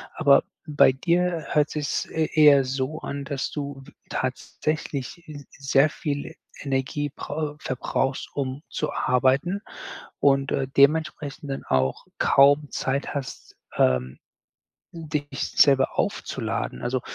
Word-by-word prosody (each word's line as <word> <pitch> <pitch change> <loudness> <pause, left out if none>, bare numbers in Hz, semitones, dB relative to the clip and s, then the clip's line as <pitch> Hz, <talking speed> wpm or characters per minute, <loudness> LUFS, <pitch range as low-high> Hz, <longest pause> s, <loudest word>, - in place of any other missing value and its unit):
Aber 140 -3 +5 0.2
bei 150 -3 +5
dir 170 +2 0
hört 150 -1 +3
sich 150 -1 -3
es - - -2
eh 160 -1 0
eher 145 -3 +7
so 135 +4 -3
an, 140 0 -5
dass 140 -1 -3
du 140 -2 -6
w - - -15 0.2
tatsächlich 155 0 -3
s 145 -2 -9 0.3
sehr 140 +3 +5
viel 145 -2 -4
E - - -11 0.3
Energie 140 +2 -1
brau 150 0 -4
verbrauchst, 135 +1 -2
um 135 0 -3
zu 155 - -3
arbeiten 135 +10 +1 0.6
und, 135 -1 +3
äh, 135 - 0
dementsprechend 145 0 +1
dann 135 - -4
auch 65 0 0
kaum 140 +1 +4
Zeit 140 +2 -2
hast, 140 -2 -7 0.2
ähm, 65 0 +1 0.8
dich 150 -3 -4
selber 135 -2 +4
aufzuladen. 60 - -2
Also, 130 0 -1
140 Hz, 130 wpm, -25 LUFS, 135-150 Hz, 0.8 s, eher